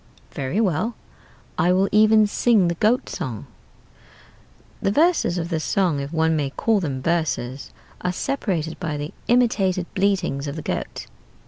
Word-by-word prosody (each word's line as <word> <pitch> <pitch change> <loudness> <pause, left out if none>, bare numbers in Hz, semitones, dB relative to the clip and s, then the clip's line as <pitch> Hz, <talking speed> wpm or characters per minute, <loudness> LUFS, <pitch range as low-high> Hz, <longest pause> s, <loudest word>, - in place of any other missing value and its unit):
"'Very 135 +9 -2
well; 215 +3 0 0.6
I 180 - +3
will 190 +2 +3
even 215 +1 +5
sing 205 -3 +3
the - - 0
goat 215 +8 +1
song.' 115 -5 -5 1.4
"The - - +1
verses 310 - +2
of 170 -1 -3
this 160 -3 -2
song 180 -7 +1
(if 140 +1 -5
one 160 0 +2
may 145 -3 0
call 220 +9 +1
them 135 -7 -3
verses) 145 -6 -1 0.3
are 180 - 0
separated 180 - -2
by 155 -4 -3
the 145 +2 -5
imitated 205 -7 +2
bleatings 185 -8 0
of 140 - -4
the 155 - -6
goat. - - -4
175 Hz, 150 wpm, -23 LUFS, 155-210 Hz, 1.4 s, even